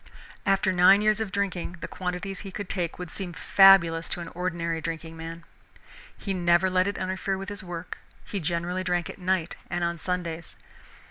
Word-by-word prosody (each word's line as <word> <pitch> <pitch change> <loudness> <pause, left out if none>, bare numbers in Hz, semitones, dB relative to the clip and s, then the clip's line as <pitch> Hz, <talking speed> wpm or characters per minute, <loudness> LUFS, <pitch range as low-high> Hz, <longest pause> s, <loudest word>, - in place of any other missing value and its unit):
After 195 -1 +3
nine 185 +3 +6
years 215 0 +3
of 220 -3 -3
drinking, 190 -3 -2
the - - -5
quantities 180 +1 -4
he 195 - -7
could 200 0 -6
take 175 -3 -1
would 180 -3 -7
seem 185 -3 -5
fabulous 170 -3 +6
to - - -3
an 170 -1 -6
ordinary 170 -2 -2
drinking 165 +1 -5
man. 165 +1 -7 0.7
He 195 - -3
never 175 +1 +3
let 185 +1 +3
it 200 - -2
interfere 190 +1 -2
with 195 +1 -6
his 205 -1 -6
work, 175 -1 -7 0.3
he 200 - -3
generally 175 +2 -1
drank 175 -1 -1
at - - -14
night 180 -2 0
and 175 0 -1
on 170 0 -1
Sundays. 170 -2 -3
180 Hz, 185 wpm, -27 LUFS, 170-190 Hz, 0.7 s, nine